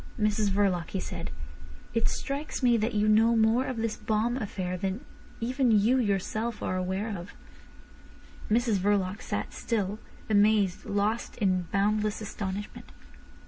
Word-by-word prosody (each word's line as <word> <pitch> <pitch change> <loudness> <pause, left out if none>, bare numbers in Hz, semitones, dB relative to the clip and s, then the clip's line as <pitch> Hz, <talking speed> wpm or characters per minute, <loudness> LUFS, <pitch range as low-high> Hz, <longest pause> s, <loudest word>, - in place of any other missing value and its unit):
"Mrs 210 -1 +2
Verloc," 190 -4 +1
he 190 - -2
said, - - -5 0.6
"it 230 0 +2
strikes 280 0 -4
me 240 -1 +5
that 220 0 0
you 210 0 +2
know 225 +2 +5
more 225 +3 +3
of 255 - -3
this 225 -1 -1
bomb 220 +2 0
affair 190 -6 -3
than 195 +8 -3 0.3
even 255 +2 +1
you 225 +4 +4
yourself 215 +1 -1
are 185 - -1
aware 190 +4 -2
of." 175 +1 -8 1.1
Mrs 225 -2 +2
Verloc 200 0 +1
sat - - -3
still, 210 -2 -2 0.3
amazed, 205 -3 +3
lost 205 +3 -1
in 185 -5 +1
boundless 210 +1 +1
astonishment. 205 -1 -5
210 Hz, 140 wpm, -28 LUFS, 195-230 Hz, 1.1 s, me